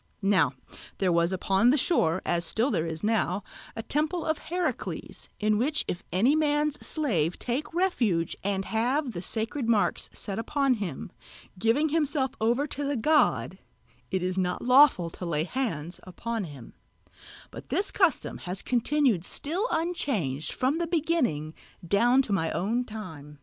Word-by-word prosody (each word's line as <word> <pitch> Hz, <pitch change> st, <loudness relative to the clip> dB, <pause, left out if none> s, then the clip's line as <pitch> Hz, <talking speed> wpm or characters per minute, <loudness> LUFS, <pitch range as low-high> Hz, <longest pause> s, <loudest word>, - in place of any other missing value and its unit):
Now 200 Hz, +1 st, +3 dB, 0.4 s
there 190 Hz, -2 st, +1 dB
was 170 Hz, +1 st, +2 dB
upon 195 Hz, +4 st, +2 dB
the 280 Hz, -, +4 dB
shore, 185 Hz, -, +1 dB
as 170 Hz, 0 st, +1 dB
still 225 Hz, +10 st, +1 dB
there 165 Hz, -, 0 dB
is 160 Hz, -1 st, -5 dB
now, 205 Hz, -3 st, +1 dB, 0.3 s
a 225 Hz, -, -5 dB
temple 310 Hz, +5 st, -1 dB
of 315 Hz, -1 st, 0 dB
Heracles, 355 Hz, +1 st, -4 dB
in 215 Hz, 0 st, +2 dB
which 300 Hz, +5 st, +1 dB
if 175 Hz, -, -3 dB
any 225 Hz, -, +3 dB
man's 295 Hz, -1 st, +1 dB
slave 180 Hz, -, 0 dB
take 255 Hz, +5 st, -3 dB
refuge 240 Hz, -, +1 dB
and 195 Hz, -1 st, -1 dB
have 250 Hz, +5 st, 0 dB
the 175 Hz, -5 st, -5 dB
sacred 230 Hz, +5 st, -1 dB
marks 215 Hz, -3 st, +2 dB
set 200 Hz, +1 st, -4 dB
upon 275 Hz, +3 st, +1 dB
him, 200 Hz, -, -5 dB, 0.5 s
giving 235 Hz, +9 st, +2 dB
himself 290 Hz, -4 st, +1 dB
over 240 Hz, +6 st, +2 dB
to 290 Hz, -1 st, -5 dB
the 285 Hz, 0 st, -1 dB
god, 300 Hz, +7 st, +2 dB, 0.5 s
it 190 Hz, -2 st, -1 dB
is 185 Hz, +1 st, -1 dB
not 180 Hz, -1 st, -1 dB
lawful 250 Hz, -, +5 dB
to -, -, -9 dB
lay 155 Hz, -2 st, 0 dB
hands 175 Hz, -, -3 dB
upon 220 Hz, +3 st, -4 dB
him; 140 Hz, -7 st, -11 dB, 0.8 s
but -, -, -10 dB
this 405 Hz, -, 0 dB
custom 360 Hz, -8 st, +1 dB
has 185 Hz, +1 st, -5 dB
continued 250 Hz, -, +2 dB
still 340 Hz, -, -2 dB
unchanged 215 Hz, -, -1 dB
from 270 Hz, +5 st, 0 dB
the 340 Hz, -, -1 dB
beginning 300 Hz, -, 0 dB, 0.3 s
down 240 Hz, +8 st, +4 dB
to 210 Hz, -, -2 dB
my 165 Hz, -4 st, +1 dB
own 230 Hz, +7 st, 0 dB
time. 160 Hz, -, -9 dB
230 Hz, 155 wpm, -27 LUFS, 180-290 Hz, 0.8 s, lawful